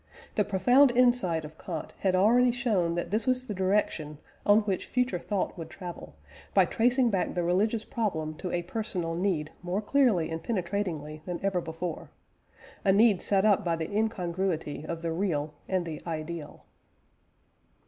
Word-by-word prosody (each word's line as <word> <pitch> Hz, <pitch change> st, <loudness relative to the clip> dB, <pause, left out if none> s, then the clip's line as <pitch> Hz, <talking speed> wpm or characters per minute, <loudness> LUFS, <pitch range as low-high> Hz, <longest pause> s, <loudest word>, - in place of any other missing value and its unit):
The 210 Hz, -, +2 dB
profound 245 Hz, +9 st, +5 dB
insight 240 Hz, -10 st, +2 dB
of 155 Hz, +1 st, -12 dB
Kant 165 Hz, -4 st, -6 dB
had 190 Hz, -2 st, +2 dB
already 235 Hz, +7 st, +5 dB
shown 215 Hz, -9 st, 0 dB
that 175 Hz, 0 st, -3 dB
this 220 Hz, +5 st, 0 dB
was 255 Hz, 0 st, +1 dB
the 215 Hz, -, -4 dB
direction 185 Hz, -6 st, 0 dB, 0.3 s
on 205 Hz, +1 st, +6 dB
which 195 Hz, -4 st, -2 dB
future 250 Hz, -7 st, 0 dB
thought 200 Hz, +2 st, -2 dB
would 165 Hz, -, -6 dB
travel, 175 Hz, -, -9 dB, 0.4 s
by 190 Hz, -2 st, +6 dB
tracing 245 Hz, +5 st, +2 dB
back 190 Hz, -3 st, -1 dB
the 175 Hz, -, 0 dB
religious 210 Hz, +6 st, +1 dB
problem 160 Hz, -9 st, -2 dB
to 180 Hz, -, -4 dB
a 175 Hz, 0 st, -1 dB
personal 180 Hz, -3 st, -2 dB
need 165 Hz, -4 st, -1 dB
more 180 Hz, +2 st, -1 dB
clearly 215 Hz, -, +2 dB
and 160 Hz, 0 st, -3 dB
penetratingly 175 Hz, -7 st, -3 dB
than 175 Hz, -1 st, -3 dB
ever 190 Hz, -3 st, +1 dB
before 165 Hz, 0 st, -5 dB, 0.7 s
a 195 Hz, -, +4 dB
need 205 Hz, -1 st, +5 dB
set 195 Hz, 0 st, +2 dB
up 205 Hz, -3 st, +4 dB
by 170 Hz, -2 st, +1 dB
the 165 Hz, +5 st, -4 dB
incongruity 180 Hz, -8 st, -1 dB
of 170 Hz, 0 st, -5 dB
the 165 Hz, -, -1 dB
real 160 Hz, -4 st, -1 dB, 0.2 s
and 185 Hz, -2 st, 0 dB
the 160 Hz, -2 st, -6 dB
ideal. 160 Hz, -1 st, -6 dB
185 Hz, 165 wpm, -28 LUFS, 165-215 Hz, 0.7 s, on